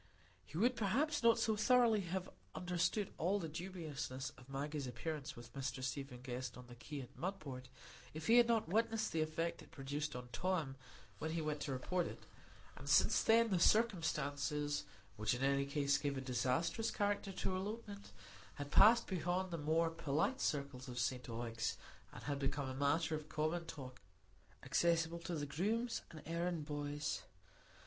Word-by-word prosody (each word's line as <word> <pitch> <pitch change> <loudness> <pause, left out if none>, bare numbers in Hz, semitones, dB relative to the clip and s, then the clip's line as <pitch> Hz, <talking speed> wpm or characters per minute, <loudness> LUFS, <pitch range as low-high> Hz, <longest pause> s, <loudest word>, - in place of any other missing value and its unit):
He 155 - -7
would 245 +6 +4
perhaps 275 +9 +1
not 230 -1 +6
so 220 - +2
thoroughly 230 0 +5
have 185 +1 -3 0.3
understood 180 +3 0
all 185 +5 +2
the 170 -5 -3
dubiousness 150 -6 -4
of 125 0 -17
Maggie's 140 0 -3
appearance 140 +4 -4
with 120 0 -11
Mr 135 -1 -3
Stephen 135 -1 -4
Guest 125 -1 -4
on 125 - -10
the 120 - -11
quay 140 +4 -6
at 130 +2 -11
Mudport 155 -9 -4 0.5
if 155 0 -6
he 230 - +6
had 240 -1 +7
not 230 -5 +2
witnessed 220 +3 +1
the 160 - +1
effect 160 +2 -1
it - - -14
produced 145 -1 -3
on 125 0 -6
Tom 160 -1 0 0.4
when 160 +1 -2
he 170 - 0
went 150 -1 -1
to 145 - -3
report 170 +7 0
it; - - -8 0.5
and - - -7
since - - +5
then, 230 0 +5
the 185 - +3
circumstances 150 -8 +2 0.3
which 105 +3 +1
in 125 - -3
any 140 0 +2
case 140 0 +2
gave 140 -1 -1
a - - -2
disastrous 130 - 0
character 205 -1 0
to 190 - -2
her 185 - 0
elopement 205 +1 -5 0.4
had 145 0 -6
passed 230 +7 +8
beyond 185 0 -1
the 170 - -2
more 160 +2 +2
polite 165 - 0
circles 140 -3 -1
of 125 -1 -6
St 125 0 -1
Ogg's, 115 -1 -2 0.3
and - - -10
had 145 -1 -2
become 135 -1 -1
matter 160 +3 +2
of 155 0 -4
common 155 +3 0
talk, 130 -4 -8 0.6
accessible 170 0 +2
to 170 0 -4
the 145 -2 -2
grooms 215 - 0
and 155 - -10
errand 170 -1 -1
boys. 145 0 -2
155 Hz, 170 wpm, -38 LUFS, 135-185 Hz, 0.6 s, passed